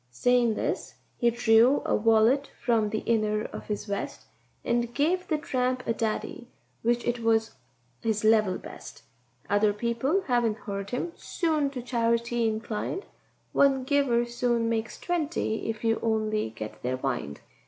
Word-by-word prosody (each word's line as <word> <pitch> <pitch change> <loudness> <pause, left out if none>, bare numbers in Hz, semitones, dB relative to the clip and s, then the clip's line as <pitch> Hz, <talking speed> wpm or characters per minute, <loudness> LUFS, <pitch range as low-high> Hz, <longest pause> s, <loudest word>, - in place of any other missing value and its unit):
Sayin' 235 - +2
this - - -3 0.2
he 240 - +4
drew 235 +3 +4
a - - +1
wallet 225 +6 +3
from 225 -3 +2
the 215 0 -3
inner 215 -2 +1
of - - -8
his 210 -1 -3
vest, 200 -2 -4 0.4
And 235 0 0
gave 360 +5 +1
the 310 - +1
tramp 255 -4 -1
a 230 - +1
daddy, 225 +2 -3 0.3
which 240 +1 +1
it 240 0 0
was 225 -1 +2 0.5
his 220 -2 -1
level 215 -4 +4
best; - - -11 0.4
Other 205 +1 +3
people 235 - 0
havin' 240 - +1
heard 200 -2 -5
him 255 +7 -2
soon 310 -5 0
to 255 -3 -6
charity 235 -1 +1
inclined— 220 - -3 0.5
One 270 -2 +4
giver 260 -3 +2
soon 240 -1 0
makes 225 0 -2
twenty 320 -11 -1
if 220 0 -4
you 225 -1 +2
only 215 - 0
get 110 -1 -8
their 130 +1 -1
wind. 120 - -3
230 Hz, 150 wpm, -27 LUFS, 215-250 Hz, 0.5 s, he